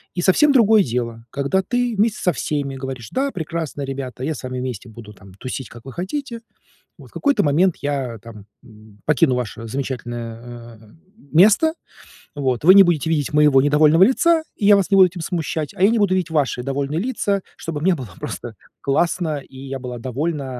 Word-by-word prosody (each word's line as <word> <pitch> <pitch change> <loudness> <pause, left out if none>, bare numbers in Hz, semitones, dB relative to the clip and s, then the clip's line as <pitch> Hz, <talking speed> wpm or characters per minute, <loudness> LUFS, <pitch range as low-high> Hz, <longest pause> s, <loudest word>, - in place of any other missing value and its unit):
И 175 - -1
совсем 240 - +4
другое 220 -5 +5
дело, 115 -3 -4
когда 140 +10 0
ты 245 +3 -1
вместе 215 +1 +1
со 180 - +2
всеми 140 0 -3
говоришь: 130 -3 -7
да, 275 +2 -1
прекрасно, 160 - -4
ребята, 135 -2 -6
я 155 +1 -2
с - - -10
вами 130 0 -4
вместе 125 -2 -5
буду 110 -1 -12
там 95 -2 -16
тусить, 130 +4 -6
как 120 0 -14
вы 135 - -9
хотите. 235 - -5 0.6
Вот - - -14
в - - -27
какой-то 285 -1 +1
момент 160 +5 +2
я 135 -5 -3
там, 105 -2 -12 0.2
м, 110 -3 -18
покину 150 -2 +3
ваше 115 -1 -5
замечательное, 120 -2 -6
э, 110 -1 -19 0.4
место, 215 - +5 0.6
вот 130 -4 -1
вы 185 - +9
не 200 - +10
будете 170 -5 0
видеть 150 -4 0
моего 150 -3 +5
недовольного 150 +3 +4
лица, 325 - +3 0.2
и 205 - -2
я 205 - +8
вас 200 -1 +1
не - - +5
буду 190 -1 +8
этим 175 0 -8
смущать, 160 -2 -3
а 185 - -1
я 200 - +7
не 230 -1 +1
буду 195 -2 +2
видеть 180 -3 -2
ваши 140 -5 0
довольные 140 +4 -2
лица, 205 -4 -1 0.2
чтобы 155 -3 -5
мне 185 +3 +3
было 130 -8 -8
просто - - -6 0.3
классно, 160 +2 0
и 135 -1 -15
я 135 0 -6
была 125 -2 -7
довольна, 140 +4 -3
145 Hz, 195 wpm, -20 LUFS, 125-185 Hz, 0.6 s, не